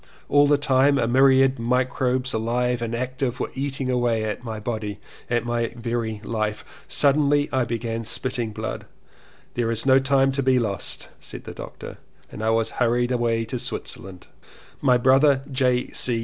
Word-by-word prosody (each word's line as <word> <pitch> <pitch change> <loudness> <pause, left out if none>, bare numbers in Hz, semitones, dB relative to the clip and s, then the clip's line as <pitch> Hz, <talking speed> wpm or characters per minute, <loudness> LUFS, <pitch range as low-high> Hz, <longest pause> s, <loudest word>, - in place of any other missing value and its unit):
All 145 0 +5
the 145 0 +4
time 140 0 +3
a 115 - +1
myriad 135 +1 +4
microbes 125 +1 0
alive 120 +2 0
and 115 0 -2
active 130 +1 -3
were - - -3
eating 135 -1 -2
away 120 -3 +1
at 110 +2 -4
my 110 -2 -5
body, 105 -2 -4 0.3
at 120 -1 0
my 120 -1 -1
very 115 -2 -3
life. 110 -2 -3 0.2
Suddenly 145 0 +3
I 130 -2 +2
began 115 0 -3
spitting 120 0 -1
blood, - - -5 0.7
''There 115 -1 -1
is 115 +1 -2
no 135 0 +6
time 135 0 +3
to 140 +1 -1
be 130 -1 +3
lost," 105 -5 -2
said - - -9
the - - -8
doctor, - - -9 0.3
and - - -8
I 110 - +1
was 115 0 +1
hurried 120 +1 +2
away 115 -2 0
to 120 +2 -4
Switzerland. 95 -5 -5 0.6
My 125 -3 +4
brother 135 +2 +4
J. 125 -1 +1
125 Hz, 165 wpm, -23 LUFS, 115-130 Hz, 0.7 s, no